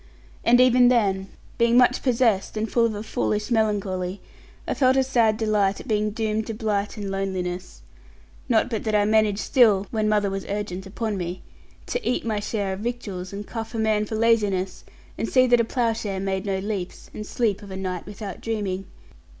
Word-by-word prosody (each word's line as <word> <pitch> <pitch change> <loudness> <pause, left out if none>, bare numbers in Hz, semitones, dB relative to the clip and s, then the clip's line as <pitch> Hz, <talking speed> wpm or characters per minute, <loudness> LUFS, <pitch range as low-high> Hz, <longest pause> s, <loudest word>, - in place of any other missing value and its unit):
And 245 +1 +5
even 250 -1 +6
then, 195 -6 +2 0.3
being 235 +1 +4
much 250 0 +4
possessed, 230 -6 +1
and 215 +1 -1
full 230 +1 +3
of 220 - -4
a 205 - -5
foolish 210 0 -1
melancholy, 200 -4 0 0.5
I - - 0
felt 260 -1 +3
a 265 - +4
sad 230 -5 +2
delight 210 -3 +1
at - - -10
being 215 -1 +1
doomed 220 0 -2
to 225 - -4
blight 210 -2 -1
and 200 -2 -4
loneliness; 185 -2 -4 0.7
not 225 -3 +3
but 225 -4 -3
that 215 -1 +1
I 205 0 +4
managed 215 -1 +2
still 215 -7 +4
(when 215 -2 0
mother 205 -2 +2
was 195 0 -3
urgent 195 -2 -4
upon 215 +1 -3
me) 180 0 -5 0.4
to 485 - -3
eat 250 - -1
my 215 -2 0
share 205 -2 -2
of 190 - -6
victuals, 205 -6 -4
and 200 +1 -6
cuff 225 +1 -6
a - - -2
man 215 -1 +1
for 220 - -4
laziness, 205 -5 +1 0.4
and 225 - -1
see 255 -1 +5
that 245 -1 +4
a - - +1
ploughshare 225 -4 -1
made 195 +1 -2
no 195 -1 0
leaps, 195 -2 -5
and 215 - -5
sleep 215 -4 0
of 205 - -11
a 190 - -6
night 185 -2 -4
without 205 -2 -7
dreaming. 195 -4 -3
210 Hz, 195 wpm, -24 LUFS, 195-230 Hz, 0.7 s, even